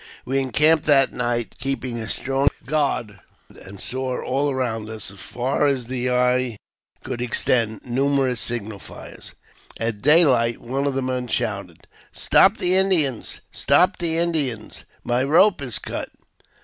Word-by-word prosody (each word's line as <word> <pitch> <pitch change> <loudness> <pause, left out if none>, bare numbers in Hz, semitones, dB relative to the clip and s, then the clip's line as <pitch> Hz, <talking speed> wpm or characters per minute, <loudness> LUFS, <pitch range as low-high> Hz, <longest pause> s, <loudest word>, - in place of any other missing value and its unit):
We 135 +2 -1
encamped 150 +4 +2
that 135 -3 +4
night, 120 -1 -3
keeping 130 -3 -3
a 110 - -6
strong 135 +3 -1 0.2
guard, 130 -8 -2 0.3
and 95 +1 -13
saw 130 0 -3
all 140 +3 -1
around 115 -5 -3
us, 110 -3 -7
as 100 - -14
far 130 +4 -1
as 135 -4 -1
the 125 +1 -3
eye 125 -2 +1 0.5
could 120 - -5
extend, 115 -2 0
numerous 130 0 0
signal 110 -1 -5
fires. - - -12 0.4
At 115 -2 -3
daylight 130 -6 +4
one 135 +4 -3
of 140 - -2
our 135 - -1
men 125 -1 -3
shouted, 100 -7 -3
" - - -28
Stop - - +3
the 180 - +3
Indians! 175 - +3
stop 180 +8 +2
the 165 -2 +4
Indians! 150 -10 0 0.2
My 120 +2 0
rope 170 +5 +3
is 125 -5 -3
cut!" - - -6
130 Hz, 150 wpm, -22 LUFS, 115-140 Hz, 0.5 s, that